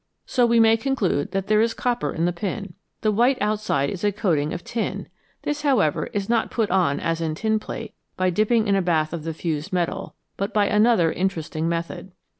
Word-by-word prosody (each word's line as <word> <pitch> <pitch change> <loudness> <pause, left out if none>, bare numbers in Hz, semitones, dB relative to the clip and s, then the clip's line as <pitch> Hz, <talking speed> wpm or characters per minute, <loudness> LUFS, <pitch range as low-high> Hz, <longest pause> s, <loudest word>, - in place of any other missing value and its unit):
So 245 -2 +2
we 235 0 +4
may 225 0 +6
conclude 225 - 0
that 195 0 -1
there 215 +1 +3
is 230 0 +1
copper 245 -1 -1
in 165 - -1
the 175 - +1
pin. 195 +1 -4 0.3
The 215 - +2
white 240 +5 +3
outside 210 - 0
is 185 - -6
a 205 - +3
coating 170 -8 0
of 175 - -5
tin; 230 -1 -3 0.4
this, 295 0 -2
how 280 -5 +3
ever, 155 -7 +1
is 200 -1 -3
not 230 -1 +1
put 220 -5 -1
on, 180 -7 +2
as 165 0 -1
in 160 -1 -1
tinplate, 220 +2 -2 0.2
by 185 0 +2
dipping 215 +4 +2
in 200 - +3
a 195 - +2
bath 160 -3 +1
of 165 -2 -5
the 165 - -2
fused 160 +1 -3
metal, 175 -2 -2 0.2
but 200 +2 -3
by 205 -1 +4
another 210 -5 +3
interesting 165 -3 -2
method. 170 +2 -4
195 Hz, 210 wpm, -23 LUFS, 170-225 Hz, 0.4 s, may